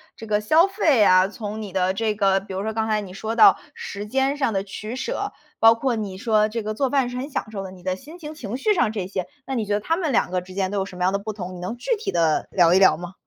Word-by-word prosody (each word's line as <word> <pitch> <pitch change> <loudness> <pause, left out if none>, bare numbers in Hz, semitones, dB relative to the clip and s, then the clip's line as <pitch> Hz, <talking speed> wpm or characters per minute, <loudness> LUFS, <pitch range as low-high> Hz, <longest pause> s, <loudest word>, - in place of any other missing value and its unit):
这 225 - -10
个 210 -1 0
消 315 - +5
费 325 - +3
啊， 185 0 +5
从 215 +1 -6
你 200 -3 -7
的 185 0 +1
这 215 +1 -1
个 195 -2 +3
比 195 0 -10
如 195 - -2
说 220 0 -3
刚 220 0 -1
才 215 -1 +1
你 185 -2 -9
说 220 +3 -4
到 410 - +7 0.2
时 210 - -6
间 270 +4 +1
上 265 -6 0
的 195 -1 -1
取 215 +4 -7
舍， - - -3 0.3
包 225 0 +7
括 240 +1 -1
你 200 -4 -4
说 215 0 +2
这 230 0 -4
个 215 0 -3
做 270 +4 0
饭 270 -3 +2
是 250 - -6
很 270 +4 -4
享 220 -5 -4
受 195 -2 -5
的， 190 - -7
你 180 -2 -14
的 185 0 -1
心 305 - -12
情、 310 -2 -8
情 245 -5 -6
绪 425 +9 +2
上 240 - +1
这 200 -5 -3
些， 185 -1 -4 0.2
那 270 - -4
你 230 -4 0
觉 205 - -1
得 205 - +1
它 325 +10 0
们 330 -6 -1
两 215 - +1
个 180 -1 0
之 185 +1 -12
间 190 -1 -1
都 205 - -1
有 190 - -1
什 185 - -11
么 180 - -2
样 190 +2 +2
的 200 - 0
不 215 +2 -5
同， 185 -3 -7
你 - - -9
能 205 +7 -5
具 470 - 0
体 435 - -3
地 165 -3 +1
聊 175 -2 +4
一 190 - +5
聊 170 -5 +5
吗？ 175 +1 -8
215 Hz, 330 characters per minute, -23 LUFS, 190-250 Hz, 0.3 s, 到